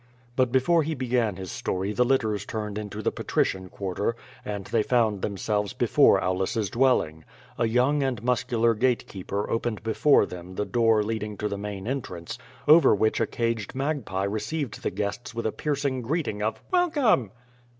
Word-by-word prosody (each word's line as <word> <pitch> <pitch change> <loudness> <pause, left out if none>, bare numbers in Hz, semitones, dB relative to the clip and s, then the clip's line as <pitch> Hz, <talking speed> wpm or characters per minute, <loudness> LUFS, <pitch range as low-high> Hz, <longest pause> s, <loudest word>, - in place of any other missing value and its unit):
But 130 -2 +2
before 135 +7 +3
he 160 +1 -2
began 120 -5 0
his 95 0 -7
story 105 -4 -2
the 125 - +3
litters 110 -6 +1
turned 105 -1 -4
into 105 0 -6
the - - +1
Patrician 95 -1 -1
Quarter, 100 +4 -2 0.3
and 100 -2 -5
they 115 - +1
found 110 -4 +1
themselves 105 0 -1
before - - +4
Aulus's 95 +3 -1
dwelling. 115 -12 +2 0.4
A 115 - +3
young 125 +6 +2
and 130 -5 -1
muscular 115 -1 +2
gate 125 +2 +1
keeper 100 +1 -4
opened 115 -2 -2
before 135 +6 +4
them 90 +1 -9
the 105 - -1
door 115 -2 +3
leading 105 -1 -3
to 105 - -2
the 100 - -3
main 100 0 -6
entrance, 95 -11 -5 0.3
over 155 -5 +7
which 110 +2 +1
a - - +1
caged 115 -1 -2
magpie 135 -9 -2
received 110 +6 -3
the - - -1
guests 105 +5 -4
with 115 - -3
a 110 - +1
piercing 140 -2 -1
greeting 130 -5 -2
of 110 +1 -2
"Welcome!" 295 - +3
110 Hz, 170 wpm, -26 LUFS, 100-130 Hz, 0.4 s, over